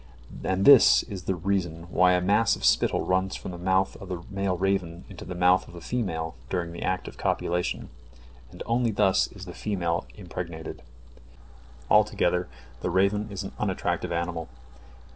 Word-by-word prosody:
And 95 Hz, +1 st, 0 dB
this 140 Hz, -4 st, +8 dB
is 95 Hz, -5 st, -8 dB
the 95 Hz, -, 0 dB
reason 85 Hz, -2 st, -2 dB
why 90 Hz, 0 st, +4 dB
a 90 Hz, -, +2 dB
mass 105 Hz, +5 st, +3 dB
of -, -, -5 dB
spittle -, -, +3 dB
runs 95 Hz, +1 st, 0 dB
from -, -, -6 dB
the 85 Hz, -, -8 dB
mouth 95 Hz, +1 st, +1 dB
of 95 Hz, -, -10 dB
the 90 Hz, -2 st, -5 dB
male 100 Hz, -2 st, -1 dB
raven 90 Hz, -2 st, -1 dB
into 95 Hz, -5 st, -10 dB
the 90 Hz, -, -6 dB
mouth 90 Hz, +1 st, +3 dB
of -, -, -13 dB
the -, -, -8 dB
female 85 Hz, -7 st, -3 dB, 0.2 s
during 85 Hz, -2 st, -2 dB
the 85 Hz, -, -8 dB
act 90 Hz, 0 st, -1 dB
of -, -, -10 dB
copulation, 90 Hz, +1 st, -1 dB, 0.6 s
and -, -, -9 dB
only 120 Hz, 0 st, +1 dB
thus 95 Hz, -2 st, +3 dB
the 95 Hz, -3 st, -10 dB
female 85 Hz, -3 st, -2 dB
is -, -, -22 dB
impregnated. 85 Hz, -3 st, -6 dB, 1.1 s
Altogether 90 Hz, -4 st, +3 dB, 0.3 s
the -, -, -2 dB
raven 100 Hz, +4 st, +2 dB
is 100 Hz, -1 st, -5 dB
an 95 Hz, -, -6 dB
unattractive 95 Hz, -4 st, -1 dB
animal. 85 Hz, -2 st, -3 dB
95 Hz, 170 wpm, -26 LUFS, 85-100 Hz, 1.1 s, this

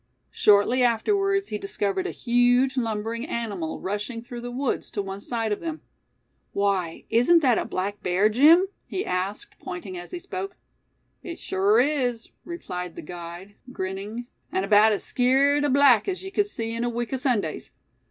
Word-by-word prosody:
Shortly 210 Hz, +5 st, +4 dB
afterwards 395 Hz, -, +2 dB
he 210 Hz, -, -3 dB
discovered 195 Hz, -1 st, -2 dB
a -, -, -3 dB
huge 245 Hz, +2 st, +2 dB
lumbering 225 Hz, -1 st, -2 dB
animal 205 Hz, -, -3 dB
rushing 210 Hz, +4 st, -4 dB
through 240 Hz, 0 st, -8 dB
the 245 Hz, -, -5 dB
woods 255 Hz, +2 st, -2 dB
to -, -, -5 dB
one 195 Hz, 0 st, -6 dB
side 225 Hz, -1 st, -2 dB
of 205 Hz, -, -1 dB
them. 320 Hz, -2 st, -5 dB, 0.7 s
"Why, 195 Hz, -4 st, -1 dB
isn't 275 Hz, +9 st, +5 dB
that 250 Hz, -4 st, +4 dB
a -, -, -2 dB
black 200 Hz, +2 st, -3 dB
bear, 185 Hz, +4 st, +2 dB
Jim?" 300 Hz, -, +6 dB, 0.2 s
he 380 Hz, -, -3 dB
asked, 185 Hz, +3 st, -3 dB
pointing 180 Hz, 0 st, -6 dB
as 175 Hz, -, -10 dB
he -, -, -5 dB
spoke. 375 Hz, +2 st, -6 dB, 0.7 s
"It 335 Hz, -, -7 dB
sure 200 Hz, +4 st, +2 dB
is," 250 Hz, -4 st, 0 dB, 0.2 s
replied 180 Hz, -, -6 dB
the -, -, -8 dB
guide, 175 Hz, +4 st, -9 dB, 0.2 s
grinning; 200 Hz, +3 st, -5 dB, 0.3 s
"an' 190 Hz, +1 st, -1 dB
'baout 210 Hz, +1 st, +6 dB
as 205 Hz, -, -1 dB
skeered 275 Hz, +3 st, +3 dB
a 290 Hz, -, +2 dB
black 275 Hz, -, +5 dB
as 380 Hz, -1 st, -3 dB
ye 385 Hz, -, -7 dB
cud 410 Hz, 0 st, +1 dB
see 225 Hz, -, -4 dB
in 230 Hz, +1 st, -2 dB
a 240 Hz, -, 0 dB
week 240 Hz, +1 st, -3 dB
o' -, -, +1 dB
Sundays. 250 Hz, -5 st, -1 dB
230 Hz, 170 wpm, -25 LUFS, 200-270 Hz, 0.7 s, Jim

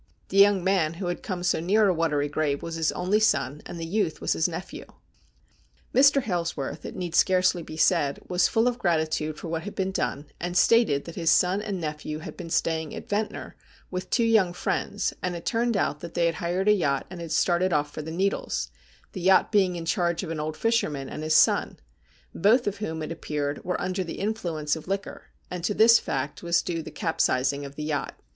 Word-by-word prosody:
The 195 Hz, -, -2 dB
young 200 Hz, -2 st, +6 dB
man 175 Hz, -4 st, +1 dB
who 185 Hz, +2 st, -5 dB
had 175 Hz, -, -4 dB
come 180 Hz, -3 st, -4 dB
so 180 Hz, -, +1 dB
near 205 Hz, +6 st, +3 dB
a 190 Hz, -, +3 dB
watery 155 Hz, -4 st, 0 dB
grave 145 Hz, -1 st, -1 dB
was 165 Hz, -, -5 dB
his 160 Hz, -1 st, 0 dB
only 185 Hz, +4 st, +1 dB
son, 150 Hz, -, +1 dB
and 170 Hz, -, -7 dB
the 165 Hz, -, -4 dB
youth 175 Hz, -2 st, -1 dB
was -, -, 0 dB
his 160 Hz, -, +1 dB
nephew. 190 Hz, -, -7 dB, 1.1 s
Mr. 275 Hz, +1 st, +5 dB
Hailsworth, 170 Hz, -, -3 dB
it -, -, -7 dB
need 175 Hz, -2 st, -4 dB
scarcely 185 Hz, 0 st, +3 dB
be 155 Hz, -1 st, -9 dB
said, 155 Hz, -3 st, +2 dB
was 180 Hz, 0 st, +3 dB
full 225 Hz, +2 st, +2 dB
of 245 Hz, -1 st, -1 dB
gratitude 155 Hz, -3 st, 0 dB
for -, -, -7 dB
what 165 Hz, 0 st, -2 dB
had 205 Hz, -, -8 dB
been 190 Hz, 0 st, -1 dB
done, 145 Hz, -6 st, -2 dB
and 175 Hz, +1 st, -2 dB
stated 210 Hz, -11 st, +4 dB
that 170 Hz, -, -8 dB
his 165 Hz, -1 st, 0 dB
son 185 Hz, +3 st, +3 dB
and 205 Hz, -3 st, -4 dB
nephew 150 Hz, -1 st, -4 dB
had 155 Hz, -, -8 dB
been 175 Hz, -3 st, -8 dB
staying 160 Hz, -1 st, -1 dB
at -, -, -8 dB
Ventnor 210 Hz, +1 st, -3 dB, 0.4 s
with 185 Hz, 0 st, -4 dB
two 235 Hz, -, +2 dB
young 215 Hz, -6 st, +3 dB
friends, -, -, -2 dB
and 180 Hz, -1 st, -2 dB
it 170 Hz, -, -8 dB
turned 235 Hz, -2 st, +1 dB
out 150 Hz, -, 0 dB
that 170 Hz, +1 st, -9 dB
they 170 Hz, -, +2 dB
had 165 Hz, -, +2 dB
hired 175 Hz, +4 st, -2 dB
a 210 Hz, -, +7 dB
yacht, 140 Hz, -9 st, 0 dB
and 180 Hz, -2 st, -7 dB
had 165 Hz, -2 st, -7 dB
started 175 Hz, +3 st, +2 dB
off 145 Hz, -2 st, 0 dB
for -, -, -5 dB
the 155 Hz, -, -7 dB
Needles, 160 Hz, -, -1 dB, 0.4 s
the 185 Hz, -, -6 dB
yacht 190 Hz, +1 st, +4 dB
being 190 Hz, -4 st, +3 dB
in 170 Hz, -1 st, -5 dB
charge 170 Hz, 0 st, 0 dB
of 165 Hz, -, -5 dB
an 160 Hz, -, -3 dB
old 155 Hz, +1 st, -4 dB
fisherman 155 Hz, -, 0 dB
and -, -, -6 dB
his 155 Hz, 0 st, +1 dB
son, -, -, +3 dB, 0.6 s
both 225 Hz, +8 st, +3 dB
of 205 Hz, -, -2 dB
whom 160 Hz, -6 st, -4 dB
it 155 Hz, -, -5 dB
appeared 145 Hz, -3 st, -3 dB
were 180 Hz, -, -2 dB
under 185 Hz, +1 st, -2 dB
the 170 Hz, -, -7 dB
influence 170 Hz, -8 st, -2 dB
of 160 Hz, -, -9 dB
liquor, 195 Hz, +1 st, -4 dB, 0.3 s
and 180 Hz, -1 st, -5 dB
to 205 Hz, +3 st, 0 dB
this 230 Hz, +1 st, +7 dB
fact 135 Hz, +2 st, -3 dB
was 170 Hz, 0 st, +1 dB
due 165 Hz, -2 st, -3 dB
the -, -, -8 dB
capsizing 140 Hz, -5 st, 0 dB
of 140 Hz, 0 st, -10 dB
the 150 Hz, -, -5 dB
yacht. 150 Hz, -2 st, -3 dB
175 Hz, 220 wpm, -26 LUFS, 155-195 Hz, 1.1 s, a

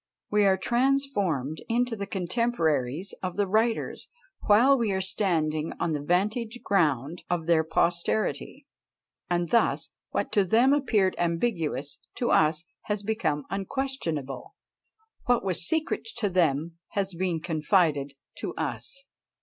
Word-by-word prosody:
We 210 Hz, -1 st, +4 dB
are 190 Hz, -1 st, +4 dB
transformed 205 Hz, -, 0 dB
into 240 Hz, 0 st, +1 dB
the 200 Hz, -2 st, -5 dB
contemporaries 180 Hz, -, -1 dB
of 185 Hz, 0 st, -4 dB
the 205 Hz, -, +2 dB
writers, 220 Hz, +4 st, 0 dB, 0.4 s
while 235 Hz, +7 st, +6 dB
we 230 Hz, -5 st, 0 dB
are 190 Hz, -, 0 dB
standing 165 Hz, -5 st, 0 dB
on 165 Hz, -, 0 dB
the 145 Hz, -, -2 dB
"vantage 210 Hz, -, 0 dB
ground" 155 Hz, -4 st, +1 dB
of 175 Hz, -2 st, -1 dB
their 165 Hz, -1 st, +3 dB
posterity; 170 Hz, +6 st, -1 dB, 0.6 s
and 175 Hz, -1 st, 0 dB
thus 235 Hz, -, +2 dB, 0.2 s
what -, -, -2 dB
to 205 Hz, -, +3 dB
them 235 Hz, +8 st, +4 dB
appeared 220 Hz, -10 st, +2 dB
ambiguous, 165 Hz, -, -1 dB, 0.2 s
to 240 Hz, -, 0 dB
us 155 Hz, +1 st, +3 dB, 0.2 s
has 210 Hz, -1 st, -2 dB
become 200 Hz, -, -1 dB
unquestionable; 195 Hz, -, -3 dB, 0.7 s
what 245 Hz, -5 st, +2 dB
was 185 Hz, -2 st, +1 dB
secret 320 Hz, -1 st, 0 dB
to 215 Hz, -4 st, 0 dB
them 165 Hz, -2 st, +1 dB
has 195 Hz, -2 st, -1 dB
been 175 Hz, -1 st, -1 dB
confided 155 Hz, -3 st, +1 dB, 0.3 s
to -, -, -4 dB
us. -, -, -4 dB
185 Hz, 130 wpm, -27 LUFS, 160-220 Hz, 0.7 s, while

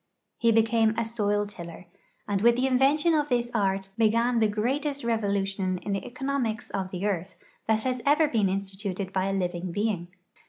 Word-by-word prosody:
He 230 Hz, -1 st, +4 dB
became 225 Hz, 0 st, +3 dB
a 230 Hz, -, 0 dB
soil 205 Hz, -2 st, 0 dB
tiller, 175 Hz, -3 st, -9 dB, 0.4 s
and 200 Hz, -1 st, 0 dB
with 235 Hz, +2 st, +5 dB
the 255 Hz, +2 st, +1 dB
invention 275 Hz, +5 st, +3 dB
of 295 Hz, -1 st, +1 dB
this 240 Hz, -1 st, 0 dB
art 195 Hz, -3 st, 0 dB
began 230 Hz, +2 st, +3 dB
the 220 Hz, -, +4 dB
greatest 275 Hz, +7 st, -1 dB
revo 225 Hz, -2 st, 0 dB
lution 195 Hz, -2 st, -1 dB
in 205 Hz, -, -3 dB
the 195 Hz, -, -2 dB
economics 255 Hz, -3 st, -3 dB
of 190 Hz, -1 st, -3 dB
the 185 Hz, +1 st, -4 dB
earth 190 Hz, -2 st, -2 dB, 0.3 s
that 220 Hz, 0 st, +2 dB
has 255 Hz, -1 st, -1 dB
ever 300 Hz, +4 st, +4 dB
been 220 Hz, -8 st, +1 dB
instituted 195 Hz, 0 st, -4 dB
by 190 Hz, 0 st, +1 dB
a 195 Hz, -, -1 dB
living 180 Hz, -1 st, -2 dB
being. 200 Hz, -2 st, -1 dB
215 Hz, 185 wpm, -27 LUFS, 195-240 Hz, 0.4 s, with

